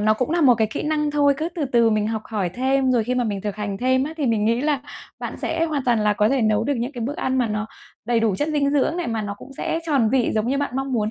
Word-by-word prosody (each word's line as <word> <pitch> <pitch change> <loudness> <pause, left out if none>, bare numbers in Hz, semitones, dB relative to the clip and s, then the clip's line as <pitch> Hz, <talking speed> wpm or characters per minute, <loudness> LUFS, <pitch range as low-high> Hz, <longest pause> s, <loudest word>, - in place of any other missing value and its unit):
nó 215 +1 +3
cũng 255 +5 -2
là 340 +1 +1
một 255 -5 +6
cái 220 -1 +1
kỹ - - -3
năng 300 -1 0
thôi, 285 -1 +3
cứ 315 +4 -2
từ 315 -4 -1
từ 235 -3 +3
mình 215 -1 +1
học 220 -1 -2
hỏi 205 -5 -2
thêm. 260 +4 +1
Rồi 230 -3 +2
khi 250 +2 -1
mà 245 -1 +1
mình 200 -3 -2
thực 205 0 -4
hành 200 -2 -4
thêm 260 +1 +2
á 310 - -5
thì 290 -5 -1
mình 220 -3 +1
nghĩ 230 +3 +2
là 295 -1 0 0.4
bạn - - -5
sẽ 330 - -1
hoàn 295 -5 -2
toàn 235 -3 +2
là 210 0 +3
có 210 +1 +2
thể 265 -3 +1
nấu 215 -1 +2
được 285 - 0
những 245 +5 -3
cái 245 - -7
bữa 255 +6 -2
ăn 260 -7 -1
mà 245 -3 +1
nó 210 0 -2 0.4
đầy 235 0 +1
đủ 220 -4 +2
chất 295 +7 -1
dinh 280 -2 +1
dưỡng 295 +4 +1
này, 350 - -2
mà 225 -2 -2
nó 200 -1 -4
cũng - - -12
sẽ 325 - -2
tròn 275 -8 +2
vị 255 -3 +2
giống 215 +2 0
như 275 - +1
bạn 285 -2 -1
mong 270 0 -2
muốn 215 -2 0
250 Hz, 320 wpm, -22 LUFS, 215-280 Hz, 0.4 s, một